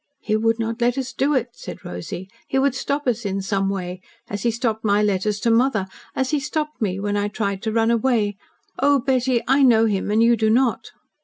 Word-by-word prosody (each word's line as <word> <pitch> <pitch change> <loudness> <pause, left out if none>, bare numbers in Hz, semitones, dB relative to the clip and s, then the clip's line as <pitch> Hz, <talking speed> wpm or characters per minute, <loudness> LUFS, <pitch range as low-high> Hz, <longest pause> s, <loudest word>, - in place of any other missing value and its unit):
"He 215 - -1
would 225 +1 +2
not 230 +1 -3
let 245 +2 +2
us 265 -1 -3
do 285 +2 +1
it," 250 -2 0
said - - -10
Rosy. 90 - -6 0.2
"He 270 - -1
would 275 -1 +3
stop 280 +2 -2
us 240 -2 0
in 195 -1 -2
some 195 0 -1
way 185 -2 -4 0.3
as 205 -1 -4
he 235 - +2
stopped 225 -1 -1
my 205 -1 +3
letters 205 +1 0
to 230 - +2
mother 230 -3 +2 0.3
as 265 +1 0
he 300 - +2
stopped 300 0 -3
me 195 -3 -1
when 205 +1 -1
I 205 0 0
tried 200 -2 -3
to 220 - -2
run 225 +1 +2
away. 225 -3 +1 0.4
Oh, 285 0 +4
Betty, 255 -2 +1
I 270 +2 +4
know 230 -4 +5
him 205 -2 -1
and 215 +2 +3
you 235 0 +5
do 220 -1 +1
not." 245 +1 +1
225 Hz, 225 wpm, -22 LUFS, 205-255 Hz, 0.4 s, know